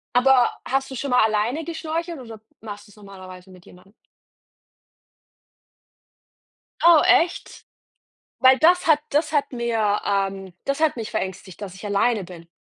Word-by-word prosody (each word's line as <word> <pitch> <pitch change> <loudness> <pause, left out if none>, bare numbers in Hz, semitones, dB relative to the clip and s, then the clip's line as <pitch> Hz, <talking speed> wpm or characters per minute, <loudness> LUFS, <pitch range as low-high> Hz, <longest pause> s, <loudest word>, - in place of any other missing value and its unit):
Aber 250 0 +4 0.2
hast 270 +1 -1
du - - -6
schon 275 +3 -4
mal 250 -2 +4
alleine 220 +8 0
geschnorchelt 330 0 -5
oder 225 -4 -11 0.2
machst 205 -1 -9
du's 205 - -19
normalerweise 190 -2 -13
mit 180 -1 -17
jemandem? 185 +3 -19 2.9
Oh, 340 -3 +7
echt? 340 +1 +1 0.7
Weil 260 0 +5
das 355 +2 +3
hat 305 -2 +4
das 300 +2 0
hat 290 -3 0
mir 225 -4 -1
ähm, 195 -1 -2
das 275 +2 -2
hat 315 -4 +1
mich 225 -2 -6
verängstigt, 190 -2 -6
dass 195 -3 -8
ich 190 - -12
alleine 205 0 0
bin. 170 -2 -13
225 Hz, 145 wpm, -22 LUFS, 195-280 Hz, 2.9 s, Oh